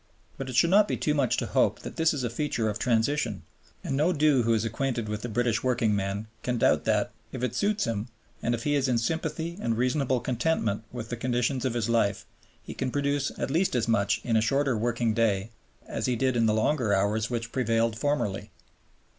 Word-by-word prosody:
But 135 -1 -6
it 125 - -5
should 170 +7 +4
not 205 +2 +6
be - - -1
too 150 - 0
much 140 -5 +1
to - - -1
hope - - +1
that - - -8
this 160 0 +3
is 145 -4 -3
a 120 - 0
feature 120 -4 -1
of 105 - -6
transition, 125 +5 0 0.4
and 135 - -2
no 150 +4 +2
one 180 -5 0
who 135 -7 +4
is 110 -1 +2
acquainted 120 0 -2
with 105 0 -3
the 120 - -4
British 115 0 0
workingman 105 -5 0 0.2
can 125 -1 -1
doubt - - +3
that, - - +1 0.2
if - - -5
it 125 - -1
suits 210 0 +1
him, 110 0 -2 0.3
and 120 +1 +1
if 115 - -7
he 145 - +1
is 140 -2 +2
in 125 -2 +2
sympathy 160 - -2
and 115 -1 0
reasonable 130 +1 +1
contentment 120 -4 -1
with 120 -2 -6
the 120 - -3
conditions 125 +2 0
of 125 -2 -1
his 115 -2 0
life, 110 -4 +1 0.4
he - - -7
can 130 - -2
produce 140 +1 0
at - - -2
least 170 0 +1
as 120 -2 +1
much 100 -3 +2
in 115 -2 0
a 110 - +4
shorter 135 +3 +1
working 115 0 0
day 110 -2 +1 0.3
as - - -3
he 125 - +1
did 130 +1 +1
in 115 -1 +3
the 110 - +3
longer 110 -1 +1
hours 105 +3 0
which 115 -1 -3
prevailed 115 -3 +1
formerly. 115 -7 -1
120 Hz, 220 wpm, -27 LUFS, 115-140 Hz, 0.4 s, not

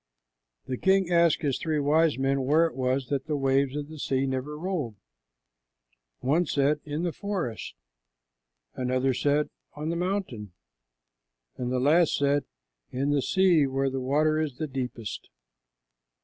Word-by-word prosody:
The 130 - -4
king 190 -2 +3
asked 170 -1 +3
his 140 -3 0
three 160 -2 -1
wise 150 +1 +3
men 135 +1 +1
where 150 +6 +4
it 165 - -3
was 130 0 -1
that 140 0 -2
the 150 -2 0
waves 135 0 +1
of 145 -1 -3
the 155 0 -10
sea 135 -1 0
never 135 +3 -3
rolled. 155 - -3 1.3
One 155 +6 +2
said, 145 +1 +2
"In 150 +2 -3
the 175 - 0
forest;" 185 - -4 1.0
another 130 +1 0
said, 145 +3 +1 0.2
"On 150 +2 -4
the 170 - -1
mountain;" 175 - -3 1.0
and 125 -1 -3
the 130 - +1
last 155 +5 +4
said, 140 0 +1 0.4
"In 135 +3 -1
the 145 -1 +2
sea 175 -3 +3
where 135 0 0
the 135 0 -3
water 155 +4 +2
is 155 -3 -1
deepest." 125 -6 -5
145 Hz, 150 wpm, -27 LUFS, 130-160 Hz, 1.3 s, where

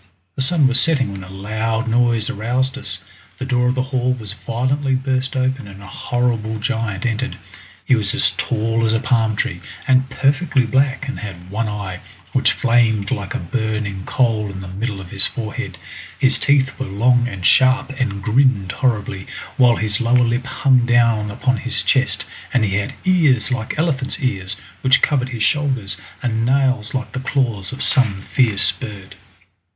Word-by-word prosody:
The - - -2
sun 150 +2 +3
was 130 0 +3
setting 135 -9 +2
when 95 -1 -7
a 95 - -11
loud 110 +4 -2
noise 115 -1 +2
aroused 125 +5 -1
us, 95 -8 -5 0.3
the 130 - -4
door 125 -2 +1
of 125 - +1
the 130 - 0
hall 130 -1 0
was 110 -5 -6
violently 130 +5 -1
burst 130 0 -1
open 130 -3 -1
and 100 0 -11
a 100 - -12
horrible 115 +1 -2
giant 110 -3 -2
entered. 125 +2 -2 0.5
He - - +3
was 105 -5 +2
as - - +3
tall 115 0 -1
as 110 -1 +2
a 115 - +2
palm 115 -3 +1
tree, 85 -3 -2 0.3
and 130 0 +3
perfectly 140 0 +1
black, 135 +4 +1
and 130 - -4
had 90 -4 -9
one 110 +2 -1
eye, 100 -3 -5 0.3
which - - +3
flamed 115 -5 +2
like 100 -1 -3
a - - -1
burning 110 0 -3
coal 110 -5 +1
in 95 -1 -7
the 95 - -8
middle 100 +3 -4
of 95 -2 -10
his 100 -1 +6
forehead. 110 -4 -5 0.4
His 130 0 +3
teeth 135 -1 +2
were 130 - -3
long 120 +5 +2
and 100 -6 -6
sharp 130 0 +4
and 100 -6 -2
grinned 115 -4 +2
horribly, 105 -7 -1 0.3
while 125 -3 +5
his 105 -1 -1
lower 120 +1 +3
lip 120 +2 -1
hung 130 -1 +3
down 115 -3 +3
upon 125 +4 0
his 125 0 -1
chest, 130 -1 +1 0.3
and 125 -4 +2
he 100 -1 0
had 105 - -3
ears 150 - +3
like 120 0 -3
elephant's 145 -5 -1
ears, 100 - -2 0.2
which 130 0 +4
covered 130 -4 +2
his 120 -4 -3
shoulders, 125 -8 0 0.3
and 115 -2 0
nails 130 -3 +1
like 125 -2 -3
the - - -4
claws 125 -7 -1
of 130 - -3
some 110 -9 +2
fierce 105 -8 +4
bird. 100 -1 -9
120 Hz, 180 wpm, -19 LUFS, 105-130 Hz, 0.5 s, his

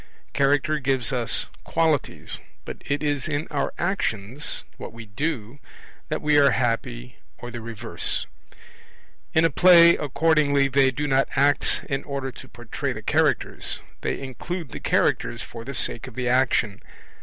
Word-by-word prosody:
Character 145 +2 +2
gives 135 -1 +1
us 120 -2 0 0.2
qualities, 160 -4 -1 0.3
but - - -7
it 145 +1 -1
is 145 -3 -1
in 150 0 -2
our 140 -2 -1
actions 135 - -2
what - - -8
we 115 0 -10
do 130 +2 -4 0.5
that - - -3
we 150 -1 +4
are 140 -1 +6
happy 115 - -2 0.2
or 120 - -8
the 120 0 -7
reverse. 115 -2 0 1.1
In 160 +1 +5
a 165 - +2
play 170 +1 +8
accordingly 145 -2 +2
they 135 0 +4
do 145 +3 -3
not 135 -1 +2
act 145 +1 +2
in 135 0 -2
order 135 -2 -4
to - - -12
portray 120 -2 -4
the - - -8
Characters; - - +1 0.2
they - - -2
include 140 +5 -6
the - - -7
Characters 120 - 0
for 115 -1 -9
the 140 +3 -6
sake 120 +1 0
of 125 - -11
the 125 -1 -2
action. 120 -5 +1
135 Hz, 155 wpm, -24 LUFS, 120-150 Hz, 1.1 s, play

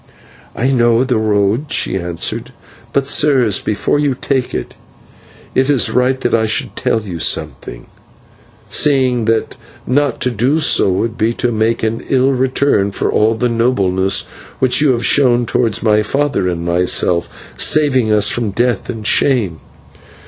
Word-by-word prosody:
"I 125 +3 0
know 120 -1 +3
the 125 -4 0
road," 110 +6 0
she - - 0
answered, 95 +7 -4 0.4
"but, 140 +1 0
sirs, 135 -8 +2
before 105 +7 -1
you 145 -3 0
take 130 0 -2
it, - - -5 0.8
it 130 +2 +1
is 140 -5 +2
right 125 +1 +1
that 120 - -1
I 110 -1 +2
should 110 - -3
tell 110 - -1
you 90 -5 -7
something, - - -3 0.8
seeing 130 -5 +1
that 115 0 -1 0.3
not 140 0 0
to 125 - 0
do 125 +8 0
so 155 - +3
would 110 +5 -2
be 110 +2 +1
to 120 - -1
make 110 +1 -1
an 110 +1 -2
ill 135 0 +2
return 130 -5 +1
for - - -2
all 110 +1 +2
the 125 +2 0
nobleness 100 -6 +1 0.3
which 130 +2 +2
you 145 -4 +3
have 120 0 -2
shown 125 -4 +3
towards 115 -3 -1
my 105 -1 +3
father 135 -3 -1
and 85 -1 -4
myself, 85 0 +1 0.3
saving 130 -7 +2
us 105 -1 +3
from 120 -3 -1
death 120 +4 -1
and 110 -3 -6
shame. 110 - +1
115 Hz, 155 wpm, -15 LUFS, 105-130 Hz, 0.8 s, know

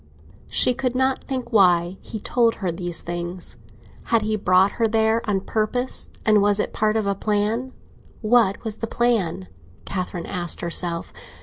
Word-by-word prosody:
She 250 - +4
could 255 0 -2
not 260 +1 +1
think 255 -3 -4
why 180 -2 +4
he 220 - -7
told 230 +1 +2
her 185 -4 -2
these 175 0 -4
things. 175 -2 -5 0.5
Had 230 -2 +2
he 215 0 0
brought 190 -1 +3
her 225 - +5
there 220 +1 +2
on 195 -2 +1
purpose, 225 +5 -1 0.2
and 215 -2 +5
was 205 0 +2
it - - -1
part 215 0 +1
of 220 - 0
a 200 - +1
plan? 215 +5 -1 0.5
What 215 -3 +3
was 220 -2 -4
the 225 - -3
plan? 220 - 0 0.4
Catherine 180 -2 -4
asked 175 -3 -2
herself. 170 0 -2
210 Hz, 165 wpm, -23 LUFS, 180-230 Hz, 0.5 s, her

